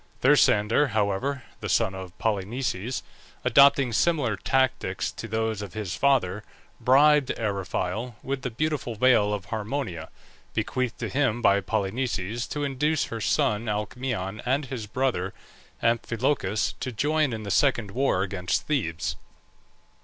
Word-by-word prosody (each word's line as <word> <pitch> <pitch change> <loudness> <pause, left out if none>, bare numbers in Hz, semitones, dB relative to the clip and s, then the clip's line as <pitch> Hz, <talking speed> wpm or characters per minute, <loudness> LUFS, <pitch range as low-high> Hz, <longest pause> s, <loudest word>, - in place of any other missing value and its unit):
Thersander, 125 -1 +4
however, 110 +6 0 0.2
the - - -5
son 95 - +2
of 95 -1 -8
Polynices, 115 +2 -2 0.4
adopting 140 -3 +5
similar 145 -6 +2
tactics 130 +5 0
to - - -7
those 110 -1 -1
of 100 -1 -8
his 105 -5 -3
father, 110 -8 +2 0.4
bribed 145 +1 +5
Eriphyle 100 +2 -2
with 135 0 -3
the 125 - -2
beautiful 135 -1 -2
veil 110 -3 +4
of 105 -3 -3
Harmonia, 110 - -4 0.5
bequeathed 125 -2 -1
to - - -3
him 130 -5 +1
by 100 -3 +4
Polynices, 110 +2 -2
to 145 - -3
induce 145 +3 +1
her 115 - -4
son 105 +2 +1
Alcmaeon 105 -1 -3
and 135 +3 0
his 125 -5 -6
brother 105 -6 -1 0.5
Amphilochus 115 -2 0
to 130 - -3
join 150 +4 +1
in 110 -1 -4
this 100 -2 -2
second 120 -7 +2
war 125 -6 +1
against 90 -2 -2
Thebes. 85 - -1
115 Hz, 130 wpm, -26 LUFS, 100-135 Hz, 0.5 s, adopting